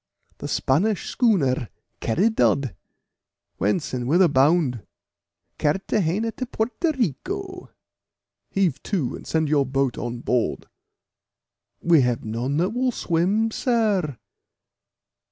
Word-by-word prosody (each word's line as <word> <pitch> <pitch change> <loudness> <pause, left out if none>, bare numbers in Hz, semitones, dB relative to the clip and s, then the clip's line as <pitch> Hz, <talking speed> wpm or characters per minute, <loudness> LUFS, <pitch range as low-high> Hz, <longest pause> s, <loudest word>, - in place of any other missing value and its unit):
"The - - -5
Spanish 185 +10 0
schooner 140 - +2 0.3
Caridad." 140 - +1 0.8
"Whence, 105 - 0
and 125 -1 -2
whither 175 +6 +5
bound?" 140 -3 +2 0.8
"Carthagena 195 +6 0
to 255 - -3
Porto 240 +8 -1
Rico." 365 - -3 0.8
"Heave 180 -8 0
to, 170 - -2
and - - -11
send 160 -1 +1
your 145 -1 +3
boat 135 -1 0
on 120 0 -4
board." 125 -2 -1 1.2
"We 165 -4 +5
have 125 -3 0
none 120 +6 -2
that 180 +5 +1
will 250 +2 0
swim, 200 +4 +1
sir." 210 - 0
165 Hz, 105 wpm, -23 LUFS, 130-220 Hz, 1.2 s, whither